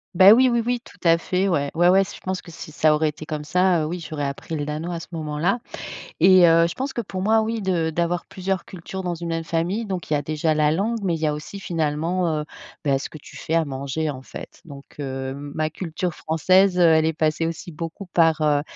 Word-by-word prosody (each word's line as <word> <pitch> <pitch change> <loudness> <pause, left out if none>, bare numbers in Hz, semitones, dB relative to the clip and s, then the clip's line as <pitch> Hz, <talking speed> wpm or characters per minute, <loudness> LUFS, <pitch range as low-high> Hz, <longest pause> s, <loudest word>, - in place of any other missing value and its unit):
Bah, 190 +3 +9
oui, 255 +2 +5
oui, 235 -1 +2
oui 245 0 0
tout - - -17
à 165 -1 +5
fait. 185 +3 0
Ouais, 145 -6 +1
ouais, 175 +2 +5
ouais, 195 +1 +5
je - - -10
pense 185 0 -3
que 170 - -14
si 160 -1 -9
ça 155 0 +3
aurait 155 0 +1
été 150 +1 -9
comme 150 -1 -4
ça, 180 +1 +2
heu, - - -1
oui 175 +3 -4
j'aurais 155 -3 -5
appris 140 +3 -5
le 145 - -2
danois 155 +4 -4
à - - -4
ce - - -10
moment-là 160 +6 -1 0.6
et 185 -2 +7
heu, 165 0 +5
je 170 - -6
pense 265 +1 -3
que 240 - -3
pour 190 -4 -5
moi 220 +2 +3
oui 225 0 -2
de 175 -4 0
d'avoir 170 +2 -1
plusieurs 190 0 -3
cultures 190 +1 -7
dans 175 -1 -2
une 170 0 -6
même 165 0 -2
famille, 175 +8 -1
donc 185 -5 -5
il - - +2
y - - +4
a 145 - -1
déjà 155 +2 0
la 150 0 +3
langue, 220 +7 0
mais 175 -3 +1
il 160 - -4
y 160 - +1
a 150 - +1
aussi 155 +7 -7
finalement, 165 0 -1
heu, - - -4 0.4
bah 135 -2 +2
ce - - -6
que 155 - -11
tu - - -14
fais 160 - -3
à 165 -1 +3
manger 140 +2 -3
en 130 -2 -7
fait. - - -10
Donc 140 -3 -11
heu, 135 -1 -4 0.2
ma 155 0 -1
culture 175 +1 -4
française, 185 +5 +3
heu, - - +5
elle 160 -2 +5
est 160 - +1
passée 155 +1 0
aussi 165 +3 -5
beaucoup 165 +5 -6
par, 165 -3 +3
heu, 145 -1 +3
165 Hz, 255 wpm, -23 LUFS, 155-185 Hz, 0.6 s, Bah